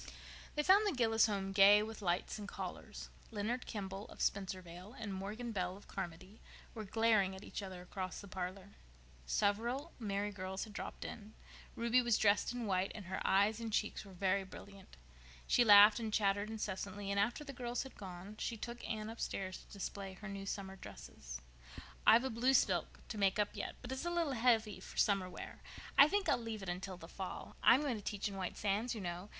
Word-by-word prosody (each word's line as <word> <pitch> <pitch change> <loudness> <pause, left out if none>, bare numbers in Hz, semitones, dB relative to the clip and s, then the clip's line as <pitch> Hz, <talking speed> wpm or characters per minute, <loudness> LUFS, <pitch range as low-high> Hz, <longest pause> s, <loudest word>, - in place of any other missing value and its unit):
They 300 - +1
found 400 +5 +6
the 370 - 0
Gillis 225 -2 +4
home 195 -2 -2
gay 200 +1 +7
with 220 0 -7
lights 180 +3 0
and 205 - -6
callers. - - -6 0.2
Leonard 230 +3 -2
Kimball, 195 -1 -5
of - - -13
Spencervale, 185 +1 -3
and 210 -3 -4
Morgan 210 +5 -4
Bell, 185 -2 -2
of 205 - -16
Carmody, 185 +2 -7 0.3
were 220 -2 -6
glaring 215 -2 +3
at 190 - -10
each - - -5
other 185 -2 -7
across 185 0 -5
the 200 - -9
parlor. 185 +1 -5 0.6
Several 235 - 0
merry 205 -2 -1
girls 190 -1 -4
had 215 - -9
dropped - - -6
in. 215 0 -8 0.4
Ruby 235 +2 +3
was 240 -2 +3
dressed 205 +1 +3
in 245 -1 -3
white 190 -1 +1
and 205 -3 -7
her 190 0 -4
eyes 205 +3 +3
and 230 -1 -4
cheeks 210 0 0
were 195 -2 -12
very 195 +1 +1
brilliant. 195 - -12 0.5
She 245 - +4
laughed 210 0 +9
and 220 -2 -3
chattered 205 0 +2
incessantly, 200 -2 -4
and 200 - +1
after 235 +9 +1
the 285 - -7
other - - -18
girls 240 0 -1
had 265 - -10
gone 190 +2 -8
she 230 - -2
took 235 +2 -6
Anne 215 -1 -2
upstairs 195 -4 -4
to - - -18
display 200 -1 -5
her 210 +3 -9
new 195 -1 -6
summer 195 -1 -4
dresses. - - -9 0.7
"I've 235 +2 +8
a 265 - -1
blue 250 +4 +3
silk - - +1
to 215 - -4
make 195 -1 +3
up 210 -1 +2
yet, - - -4
but 245 - -6
it's 265 +5 -3
a - - +1
little 340 -5 0
heavy 225 -4 +2
for - - -11
summer 195 -3 +3
wear. 180 - -9 0.3
I 280 - +9
think 400 +3 0
I'll - - +4
leave 225 -3 -5
it 190 - -4
until 185 +1 -4
the 165 - -10
fall. 190 +1 -6
I'm 255 - +7
going 275 -6 0
to - - -7
teach 205 0 -2
in 200 - -5
White 185 -2 -4
Sands, 210 +4 0
you 215 - -5
know. 175 +2 -5
205 Hz, 205 wpm, -36 LUFS, 190-230 Hz, 0.7 s, laughed